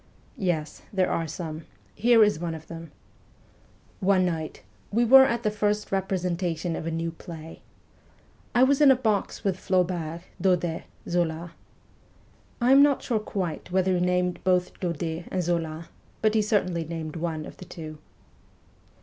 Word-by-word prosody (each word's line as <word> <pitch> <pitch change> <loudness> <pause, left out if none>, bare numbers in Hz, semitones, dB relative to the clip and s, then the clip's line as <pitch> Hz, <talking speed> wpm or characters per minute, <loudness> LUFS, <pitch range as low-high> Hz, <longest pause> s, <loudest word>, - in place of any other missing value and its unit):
' - - -31 0.2
Yes, 155 -2 -5
there 190 -2 +1
are 165 -1 -1
some. 160 0 -6 0.3
Here 230 0 +5
is 205 -6 +2
one 170 -1 -3
of 160 0 -10
them. 165 -2 -9 1.1
One 190 -1 +3
night, 160 -3 -3 0.3
we 235 +3 +3
were 265 +3 +9
at 235 -3 -1
the 210 - +1
first 210 0 -1
representation 180 -3 -1
of 160 - -5
a - - 0
new 165 0 -2
play. 165 -1 -10 0.9
I 245 - +6
was 275 +2 +3
in 290 - +8
a 265 - +7
box 220 -6 -1
with 190 -2 0
Flaubert, 175 -4 0 0.2
Daudet, 175 -3 +1 0.2
Zola.... 170 -1 -1 1.1
(I 245 +1 +3
am 275 +1 +8
not 285 -1 +3 0.2
quite 180 -6 -3
sure - - -17
whether 190 0 +3
he 180 -1 +1
named 180 0 0
both 180 -1 +1
Daudet 170 -1 -3
and 185 -1 -1
Zola, 165 -1 -2 0.3
but 215 0 +4
he 220 - +3
certainly 185 -5 +1
named 160 -1 -5
one 160 -2 -3
of - - -11
the 185 - -10
two). 155 -3 -9
180 Hz, 160 wpm, -26 LUFS, 165-200 Hz, 1.1 s, were